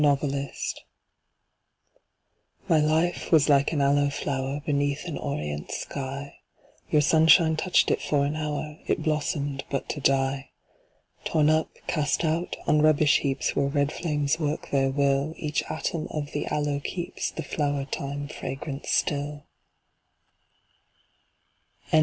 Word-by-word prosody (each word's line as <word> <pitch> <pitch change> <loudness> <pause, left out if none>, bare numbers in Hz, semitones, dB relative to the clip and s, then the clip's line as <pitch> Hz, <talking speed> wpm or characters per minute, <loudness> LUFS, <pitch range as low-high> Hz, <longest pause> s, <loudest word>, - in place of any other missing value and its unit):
The 150 - +5
Aloe 140 -1 0 2.2
My 160 - +4
life 160 +3 +1
was 155 -3 +5
like 140 -1 +4
an 150 -3 0
Aloe 140 +1 +3
flower, 135 0 -2
beneath 145 +1 0
an 170 -4 -4
orient 75 - -4
sky, 140 +1 -5 0.5
Your 150 -1 +4
sunshine 160 +1 +5
touched 180 +3 +2
it - - +1
for 140 -1 +1
an 145 +2 -2
hour; 150 0 -4
it - - 0
blossomed 145 -2 -1
but 140 - -2
to 150 - -3
die. 135 0 +1 0.7
Torn 155 -1 +3
up, 155 0 +2 0.2
cast 150 +1 0
out, 165 +3 -1
on 150 - +3
rubbish 155 -1 +5
heaps 135 -1 -1
where 140 - +2
red 145 +1 +1
flames 150 -2 -1
work 150 -1 -2
their 135 -1 +2
will 140 +2 +1
Each 150 -1 -1
atom 160 0 -2
of 145 -2 -4
the 145 - -3
Aloe 145 -1 0
keeps 175 -2 -3
the 165 - -6
flower 145 -1 -1
time 140 +1 -4
fragrance 140 0 -6
still. 145 0 0
145 Hz, 135 wpm, -26 LUFS, 140-155 Hz, 2.2 s, The